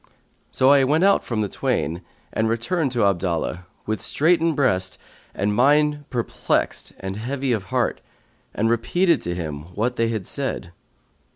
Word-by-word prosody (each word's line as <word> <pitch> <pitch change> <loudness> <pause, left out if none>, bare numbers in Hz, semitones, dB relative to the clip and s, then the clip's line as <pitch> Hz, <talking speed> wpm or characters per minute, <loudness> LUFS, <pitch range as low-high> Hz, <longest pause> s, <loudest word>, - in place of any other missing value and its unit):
So 130 +1 +4
I 140 -1 +6
went 150 +6 +2
out 200 0 +4
from 115 -3 -2
the 105 - 0
twain 85 -2 -1 0.3
and 110 0 +1
returned 135 +6 0
to 120 - +1
Abdallah, 90 -1 -1 0.2
with 110 0 -2
straitened 165 +1 +2
breast 95 -10 +1 0.4
and 105 +2 0
mind 145 +3 +3
perplexed 120 -3 -1
and 95 0 -4
heavy 130 +4 -2
of 105 -5 -1
heart, - - -1 0.5
and 110 - 0
repeated 170 +10 +2
to 85 0 -3
him 75 -4 -4
what 120 +4 -1
they 115 - +2
had 110 -5 -3
said. 130 -10 -4
115 Hz, 155 wpm, -23 LUFS, 95-140 Hz, 0.5 s, I